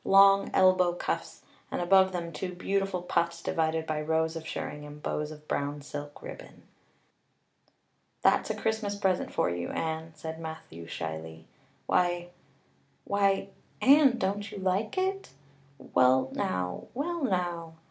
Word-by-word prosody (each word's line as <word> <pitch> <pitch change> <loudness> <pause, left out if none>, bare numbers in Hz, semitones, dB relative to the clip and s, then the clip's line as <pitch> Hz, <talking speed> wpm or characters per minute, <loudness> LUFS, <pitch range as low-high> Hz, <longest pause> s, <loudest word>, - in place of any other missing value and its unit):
Long 195 0 +6
elbow 185 -2 +5
cuffs, - - -3 0.3
and - - -2
above 190 +1 +5
them 170 -2 -4
two 180 +3 -5
beautiful 195 0 -1
puffs 170 -1 0
divided 160 0 0
by 155 -1 -1
rows 160 +1 +1
of 160 0 -6
shirring 150 -2 -5
and 150 0 -10
bows 150 0 -2
of 150 0 -12
brown 145 0 -2
silk 145 0 -7
ribbon. - - -10 1.6
"That's - - +4
a - - -1
Christmas 220 -2 -1
present 190 -3 0
for - - +1
you, 85 0 -3
Anne," 160 0 -3
said 160 +1 -6
Matthew 160 - -8
shyly. 80 -1 -6 0.4
"Why 175 -1 +1 0.7
why 195 -1 +1 0.3
Anne, 275 -2 +6
don't 200 +1 -2
you - - -7
like 190 - 0
it? 385 +1 -1 0.5
Well 130 0 +3
now 90 -1 -2
well 340 +5 -2
now." 175 -6 -1
170 Hz, 135 wpm, -29 LUFS, 150-195 Hz, 1.6 s, Long